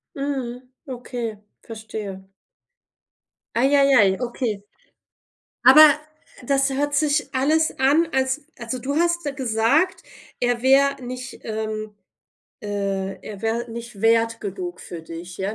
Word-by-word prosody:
Mhm, 260 -3 -4 0.2
okay, 245 -4 -5 0.2
verstehe. 215 -4 -7 1.3
Ei, 240 +3 +4
ei, 275 -1 +5
ei, 195 +2 +3
okay. 235 -4 -3 1.0
Aber 305 -1 +9 0.5
das 275 0 +2
hört 285 +2 -1
sich 295 0 +1
alles 310 +4 +2
an, 290 +6 +4
als 265 +2 0
also 240 +1 -5
du 280 +4 -3
hast 345 +1 +1
gesagt, 265 - +1 0.4
er 245 -1 0
wär 275 +1 +4
nicht, 255 +1 -7
ähm 215 -1 -4 0.7
äh, 195 -2 -3
er 205 -2 -8
wär 230 +2 -2
nicht 235 -2 -8
wert 230 +1 +2
genug 180 -3 -6
für 170 - -8
dich 165 +2 -9
ja, 195 +3 -2
240 Hz, 120 wpm, -22 LUFS, 215-275 Hz, 1.3 s, Aber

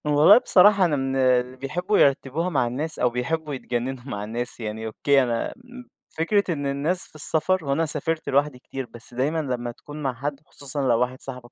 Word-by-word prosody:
والله 150 +6 +7
بصراحة 200 -4 +5
أنا 160 -4 +1
من 135 -1 -2
اللي 130 -1 +2
بيحبّوا 180 +10 -1
يرتّبوها 140 +5 +2
مع 135 -8 +1
الناس 150 +7 -3
أو 125 - +3
بيحبّوا 150 +6 -3
يتجنّنوا 125 0 -4
مع 105 -7 -5
الناس، 120 +4 -4
يعني 110 0 -5
أوكي 135 +5 +2
أنا 120 -2 -1
آآ - - -10 0.6
فكرة 180 +3 0
إن 145 -2 -4
الناس 145 +7 -1
في - - -14
السفر 160 +3 +1
وأنا 140 +4 +1
سافرت 160 +1 0
لوحدي 140 -1 +1
كتير، 135 +1 -6
بس 120 0 -12
دايمًا 140 +6 0
لمّا 125 -4 -3
تكون 145 +5 -10
مع 135 -2 0
حد 140 +3 -4
خصوصًا 140 +1 -6
لو 115 -2 +3
واحد 125 +1 -1
صاحبك 125 -2 -8
140 Hz, 195 wpm, -24 LUFS, 125-155 Hz, 0.6 s, والله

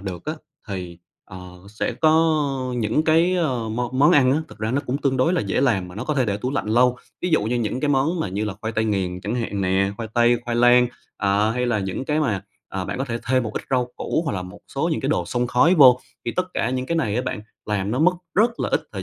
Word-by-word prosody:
được 95 -3 -6
á 155 - -2 0.4
thì, 90 -3 -6 0.3
ờ, 95 - -10 0.3
sẽ 105 - -3
có 160 0 +4 0.4
những 115 +7 0
cái, 165 +3 +3
ờ, 130 -10 -1
món 120 +3 -3
món 145 - +6
ăn 130 -2 +5
á, 150 - +2
thực - - -14
ra 110 +1 -2
nó 140 +3 +1
cũng 130 +3 -1
tương 135 -3 0
đối 145 +8 +2
là 180 - +1
dễ - - -1
làm 100 -10 +1
mà 90 - -11
nó 115 +4 -5
có 150 - -1
thể 130 -3 +2
để 100 -1 0
tủ 125 +5 -3
lạnh 135 -5 -2
lâu. 125 +2 +3 0.3
Ví 180 - 0
dụ 155 - +3
như 120 +3 -1
những 120 +2 -2
cái 150 - 0
món 145 +5 +1
mà - - -1
là 105 0 -2
khoai 110 +1 -3
tây 110 +1 0
nghiền 95 -4 -1
chẳng 105 +5 -3
hạn 110 -5 -2
nè, 95 +1 +1
khoai 115 -2 -5
tây, 120 0 +4
khoai 120 -1 -2
lang, 120 +1 +6 0.3
à, 100 +2 +1
hay 125 +2 -1
là 115 -3 +1
những 95 +6 -3
cái 150 +2 0
mà, 105 -9 0 0.3
à, 95 -1 -4
bạn - - -4
có 135 - -1
thể 120 -3 -3
thêm 130 0 +2
một 110 -2 -4
ít - - -3
rau 125 -1 +1
củ 165 - -1
hoặc - - 0
là 90 -2 -3
một 90 +2 -10 0.2
số 155 +5 0
những - - -1
cái 135 - -2
đồ 155 - +1
xông 125 -1 -1
khói 125 +9 +4
vô. 130 -5 +7 0.3
Thì 120 - -2
tất 185 - +2
cả 120 - 0
những 130 0 -2
cái 170 - -1
này 110 -9 0
á 125 - 0
bạn, 105 - -4 0.3
làm 105 -1 -1
nó 125 - -1
mất 180 +4 +5 0.2
rất 230 +4 +2
là - - 0
ít - - 0
thời - - -5
120 Hz, 280 wpm, -22 LUFS, 105-140 Hz, 0.4 s, vô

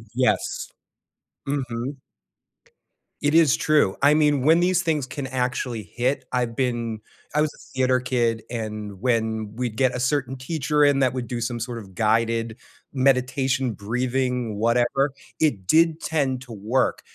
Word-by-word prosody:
Yes. 130 0 0 0.8
Mhm. 135 -1 -3 1.2
It 145 +1 +1
is 165 -5 +6
true. 150 -11 +2
I 145 +2 +6
mean, 150 -2 +3
when 160 +5 +5
these 185 +1 +2
things 155 -5 0
can 130 +1 -5
actually 125 -2 -2
hit, 125 +5 -2
I've 120 -2 -1
been 120 -3 -1 0.4
I 150 - +4
was 155 -1 +1
a - - -18
theater 130 -1 +2
kid, 120 -3 0
and 105 -4 -5
when 110 -3 -1
we'd 120 -2 -3
get 130 +1 +2
a - - -2
certain 130 0 0
teacher 150 +2 0
in 145 -1 +4
that 130 -2 +2
would 125 -2 -4
do 120 0 -4
some 120 0 -2
sort 120 0 -4
of 95 -4 -13
guided 115 +1 +1 0.4
meditation, 130 0 +2
breathing, 125 +2 -1
whatever, 120 +5 +2 0.3
it 115 -13 +1
did 165 - +4
tend 135 -7 -1
to 125 -2 -12
work. 110 +5 0
125 Hz, 150 wpm, -24 LUFS, 115-140 Hz, 1.2 s, is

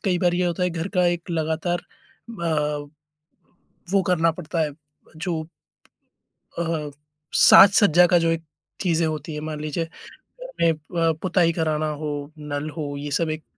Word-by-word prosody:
कई 180 -3 +1
बार 175 -1 +2
ये 180 0 +1
होता 175 +1 -2
है 180 - +1
घर 165 +2 -4
का 180 -1 +3
एक 175 0 -2
लगातार 165 +2 -1
अ, 155 - -4 1.0
वो 195 0 +4
करना 165 -2 +3
पड़ता 165 +1 -5
है 150 -2 -1 0.5
जो। 165 0 -2 1.2
अ, 160 -3 -2 0.4
साज-सज्जा 195 -3 +7
का 175 - +5
जो 165 0 +1
एक 165 0 -1 0.4
चीज़ें 170 -3 +1
होती 155 0 -4
है 150 - -4
मान 155 -1 -5
लीजिए। 155 +2 -2 0.4
घर - - -13
में 165 -1 +5
अ, 165 +2 -1
पुताई 180 -2 +2
कराना 155 -2 0
हो, 145 -1 -4
नल 150 0 -4
हो, 145 -2 -4
ये 145 +1 -6
सब 160 +3 0
एक 155 0 -4
165 Hz, 160 wpm, -23 LUFS, 155-175 Hz, 1.2 s, साज-सज्जा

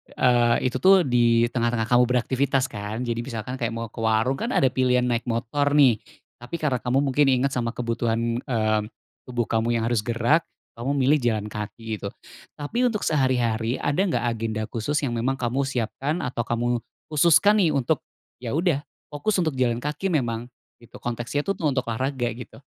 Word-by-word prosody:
eee, 120 0 +3
itu 130 - -3
tuh 190 -1 +6
di 120 -3 +3
tengah-tengah 120 -1 -1
kamu 125 0 +6
beraktivitas 130 +1 +1
kan. 105 +3 -4
Jadi 115 -1 -2
misalkan 120 +1 -5
kayak 115 -1 -2
mau 115 -1 -5
ke - - -10
warung, 115 +4 +1
kan - - -2
ada 130 -2 +3
pilihan 125 -1 +2
naik 120 -1 -1
motor 140 +5 0
nih, 130 -7 +5 0.4
tapi 120 +7 -7
karena 145 -6 0
kamu 130 +4 +1
mungkin 140 +1 +2
ingat 135 +1 +2
sama 120 -2 -2
kebutuhan, 115 0 -1
eee, 110 -5 0 0.5
tubuh 120 -1 -1
kamu 115 +1 0
yang 115 - 0
harus 115 -1 +1
gerak, 120 +8 +1 0.3
kamu 135 +4 -1
milih 140 +3 +3
jalan 110 -4 -1
kaki 110 +1 -5
gitu. 100 - -4 0.5
Tapi 235 +13 0
untuk 215 -3 -2
sehari-hari 125 -5 +1
ada 145 +5 -1
nggak 120 -9 0
agenda 115 -2 -2
khusus 120 +6 -2
yang 130 - 0
memang 120 +3 0
kamu 135 +2 -1
siapkan 135 +6 -2
atau 120 -2 -3
kamu 120 +1 0 0.3
khususkan 175 +7 +5
nih 165 -5 +3
untuk, 140 +2 +1 0.4
ya 125 +2 -4
udah 165 -4 +2 0.3
fokus 175 +9 -1
untuk 170 -4 +1
jalan 120 0 +1
kaki 150 +6 -2
memang? 120 -9 -1 0.3
Gitu, 120 0 -17
konteksnya 120 +4 -3
itu 195 - -1
tuh 165 -5 -1
untuk 130 -3 0
olahraga, 130 0 -1
gitu. 125 +3 -10
125 Hz, 180 wpm, -24 LUFS, 115-140 Hz, 0.5 s, tuh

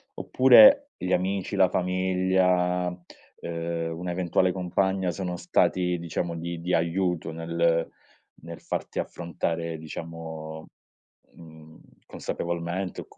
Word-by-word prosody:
Oppure 275 - +6
gli 90 - -4
amici, 95 +1 -1
la 95 - +4
famiglia, 90 0 +1
uhm, 85 -2 -6
un'eventuale 90 +1 0
compagna 95 0 0
sono 90 -1 -4
stati 90 0 +1
diciamo 85 0 -3
di 85 0 -5
di 90 +2 -2
aiuto 85 0 0
nel 85 0 0 0.5
nel 85 +1 -10
farti - - -5
affrontare 85 -1 -3
diciamo, 80 0 -8 0.7
mhmm, 80 -1 -15 0.3
consapevolmente 85 +2 -4
o - - -11
c - - -23
85 Hz, 105 wpm, -26 LUFS, 85-90 Hz, 0.7 s, Oppure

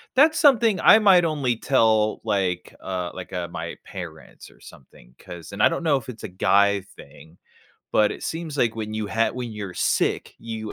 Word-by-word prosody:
That's 315 +4 +4
something 235 - +4
I - - +8
might 190 -5 +5
only 145 -7 -1
tell, 110 -5 +2
like, 95 -5 -2
uh, 90 -2 -4
like, 95 -1 -9
uh, 90 -1 -3
my 85 - -6
parents - - -10
or - - -23
something 60 -2 -17
'cause 85 +1 -11
and 100 - -5
I - - +6
don't - - -4
know 150 -4 +2
if 130 0 -9
it's 115 -3 -10
a - - -4
guy 100 +1 +2
thing, 80 -3 -17 0.6
but 105 -1 +3
it - - -10
seems 160 -3 -5
like 115 -3 +1
when 110 -1 -5
you 110 -1 -3
have 115 +3 0
when 125 -2 -5
you're 100 -3 -7
sick, - - -1
you 110 -2 -7
110 Hz, 195 wpm, -23 LUFS, 95-140 Hz, 0.6 s, I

